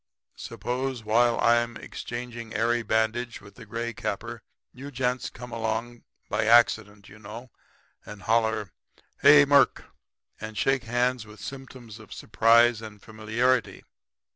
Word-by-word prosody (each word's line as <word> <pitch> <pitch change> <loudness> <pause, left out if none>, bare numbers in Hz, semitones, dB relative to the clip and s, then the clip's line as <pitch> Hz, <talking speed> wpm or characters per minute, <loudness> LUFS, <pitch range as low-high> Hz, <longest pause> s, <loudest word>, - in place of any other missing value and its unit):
Suppose 125 -1 -4
while 115 +2 +2
I'm 120 0 +2
exchanging 120 -1 -7
airy 120 +2 +1
bandage 110 +2 -1
with 100 0 -16
the 115 -3 -14
gray 115 +2 -4
capper 115 +3 -5 0.3
you 135 +3 -9
gents 125 -2 -2
come 125 0 -11
along, 115 +1 -4 0.2
by 110 - -1
accident, 110 -3 +3
you 105 +2 -15
know, 110 +4 -10 0.5
and 105 -2 -11
holler: 110 -3 0 0.5
"Hello, 145 0 +8
Murk!" 140 -1 +3 0.5
and 110 0 -8
shake 135 +1 +1
hands 120 0 0
with 105 -1 -14
symptoms 130 -4 -10
of 110 - -12
surprise 115 +1 +3
and 105 -2 -10
familiarity. 110 +4 -1
115 Hz, 130 wpm, -26 LUFS, 110-125 Hz, 0.5 s, Hello